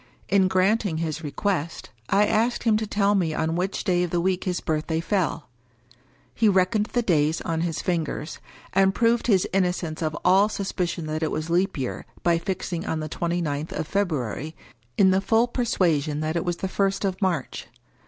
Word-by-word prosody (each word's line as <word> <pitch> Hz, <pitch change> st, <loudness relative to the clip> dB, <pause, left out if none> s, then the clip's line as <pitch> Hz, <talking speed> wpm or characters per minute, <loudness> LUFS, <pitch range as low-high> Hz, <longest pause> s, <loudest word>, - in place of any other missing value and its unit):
In 195 Hz, -1 st, +4 dB
granting 190 Hz, -1 st, +1 dB
his 160 Hz, -1 st, -3 dB
re 150 Hz, -, -3 dB
quest, 170 Hz, -1 st, -2 dB, 0.2 s
I 205 Hz, +1 st, +4 dB
asked 230 Hz, +3 st, +1 dB
him 225 Hz, -2 st, +3 dB
to 220 Hz, 0 st, -3 dB
tell 205 Hz, 0 st, +2 dB
me 170 Hz, -6 st, +1 dB
on 160 Hz, +1 st, 0 dB
which 185 Hz, +3 st, -2 dB
day 180 Hz, -1 st, +2 dB
of 180 Hz, -, 0 dB
the 175 Hz, -, 0 dB
week 185 Hz, +1 st, 0 dB
his 180 Hz, -2 st, -1 dB
birthday 160 Hz, 0 st, -1 dB
fell. 170 Hz, -3 st, -1 dB, 0.9 s
He 220 Hz, -2 st, +3 dB
reckoned 195 Hz, +3 st, +2 dB
the 240 Hz, 0 st, -1 dB
days 160 Hz, -5 st, +2 dB
on 165 Hz, -1 st, -2 dB
his 165 Hz, -2 st, -2 dB
fingers; 165 Hz, -3 st, -2 dB, 0.3 s
and 195 Hz, +1 st, +3 dB
proved 235 Hz, 0 st, +2 dB
his 195 Hz, -6 st, +3 dB
innocence 180 Hz, -4 st, 0 dB
of 155 Hz, -1 st, -2 dB
all 195 Hz, +3 st, +5 dB
suspicion 180 Hz, -5 st, -3 dB
that 155 Hz, +1 st, -3 dB
it 160 Hz, -, 0 dB
was 155 Hz, +2 st, -3 dB
Leap 185 Hz, +2 st, +1 dB
Year, 130 Hz, -3 st, -4 dB, 0.2 s
by 170 Hz, -1 st, +3 dB
fixing 175 Hz, -1 st, -3 dB
on 160 Hz, -, -2 dB
the 155 Hz, 0 st, -4 dB
twenty 170 Hz, +1 st, -1 dB
ninth 145 Hz, 0 st, -3 dB
of -, -, -3 dB
February, 155 Hz, -, -2 dB, 0.4 s
in 190 Hz, -2 st, +5 dB
the 190 Hz, +1 st, +2 dB
full 225 Hz, +4 st, +3 dB
persuasion 165 Hz, -, 0 dB
that 155 Hz, +1 st, -2 dB
it 170 Hz, -, -1 dB
was 175 Hz, -1 st, -1 dB
the 190 Hz, -, -3 dB
first 195 Hz, +1 st, 0 dB
of 190 Hz, +1 st, -2 dB
March. 170 Hz, -12 st, -2 dB
180 Hz, 190 wpm, -25 LUFS, 160-195 Hz, 0.9 s, all